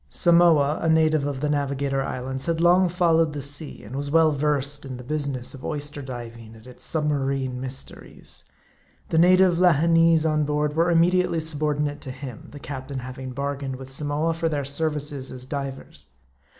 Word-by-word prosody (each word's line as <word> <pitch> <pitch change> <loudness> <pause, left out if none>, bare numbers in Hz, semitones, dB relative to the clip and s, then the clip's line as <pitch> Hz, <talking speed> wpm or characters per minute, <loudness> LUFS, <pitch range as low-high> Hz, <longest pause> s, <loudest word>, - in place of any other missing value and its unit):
Samoa, 170 -4 +4
a 165 - +1
native 155 -2 +3
of 135 -2 -4
the 150 - 0
Navigator 140 -1 -1
Islands, 130 +2 -4
had 165 -1 0
long 175 +2 +4
fol 170 -2 +2
lowed 165 -2 +2
the 145 - -4
sea, 145 +2 -4
and 115 +6 -9
was 140 +1 -2
well 160 +1 +4
versed 145 -1 0
in 130 -2 -7
the 125 - -9
business 140 -2 -3
of 135 - -11
oyster 145 -1 -3
diving 115 -3 -8
and 110 +1 -16
its 125 -1 -12
submarine 135 -4 -1
mysteries. 130 +1 -7 0.7
The 160 - +2
native 180 0 +5
Lahineese 165 -1 +4
on 155 -1 +2
board 150 0 -1
were 165 +2 +3
immediately 170 0 +3
subordinate 150 -2 -1
to 135 - -8
him; 130 -3 -9
the 145 - -11
captain 140 -1 -6
having 130 0 -7
bargained 140 0 -3
with 130 0 -10
Samoa 150 +4 0
for 165 0 -1
their 145 -3 -2
services 145 -1 -2
as 125 0 -8
divers. 135 - -6
145 Hz, 175 wpm, -24 LUFS, 135-160 Hz, 0.7 s, native